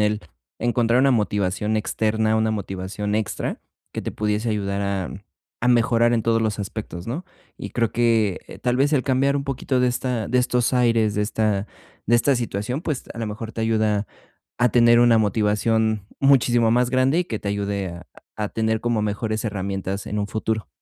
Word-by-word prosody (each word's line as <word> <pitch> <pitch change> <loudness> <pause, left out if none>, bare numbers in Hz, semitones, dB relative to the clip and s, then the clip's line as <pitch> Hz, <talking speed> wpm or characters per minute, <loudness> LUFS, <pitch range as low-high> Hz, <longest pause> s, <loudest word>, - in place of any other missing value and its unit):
el 105 0 +1 0.4
encontrar 120 0 +2
una 135 +1 +4
motivación 105 -2 0
externa, 110 0 0
una 110 0 +1
motivación 100 0 -3
extra 110 -1 -2 0.3
que - - -4
te - - -3
pudiese 105 +2 -1
ayudar 100 -2 -2
a 100 -2 -2 0.5
a - - +3
mejorar 120 -1 +3
en 115 -2 +1
todos 115 0 +2
los 110 -2 -1
aspectos, 100 -3 -6
¿no? 140 +11 -4 0.3
Y - - -7
creo 115 -2 0
que, 115 -5 +2
eh, - - -10
tal 125 -1 0
vez, 140 +3 +2
el 140 -4 +2
cambiar 135 +1 +2
un 140 - -2
poquito 135 -1 -1
de 125 - +3
esta 125 -2 -2
de 125 - +2
estos 125 -1 +1
aires, 115 -4 +2
de 105 - +1
esta 105 -1 0 0.4
de 120 - +4
esta 135 +4 +3
situación, 120 +2 -3
pues, 150 -7 -3
a - - -8
lo 115 - -2
mejor 110 +2 -6
te - - -5
ayuda 110 -2 +1 0.5
a 125 0 +4
tener 120 0 +5
una 120 -1 +5
motivación 110 0 +1
muchísimo 120 -4 +4
más 125 +2 +2
grande, 130 +4 +3
y - - +1
que 110 -7 -4
te 100 - -3
ayude 100 -1 -2
a 85 0 -9 0.3
a 105 -1 -3
tener 110 0 -1
como 120 -2 0
mejores 110 +1 -2
herramientas 100 -1 -3
en 105 - -3
un 100 - -1
futuro. 110 -1 -2
110 Hz, 190 wpm, -23 LUFS, 105-120 Hz, 0.5 s, tener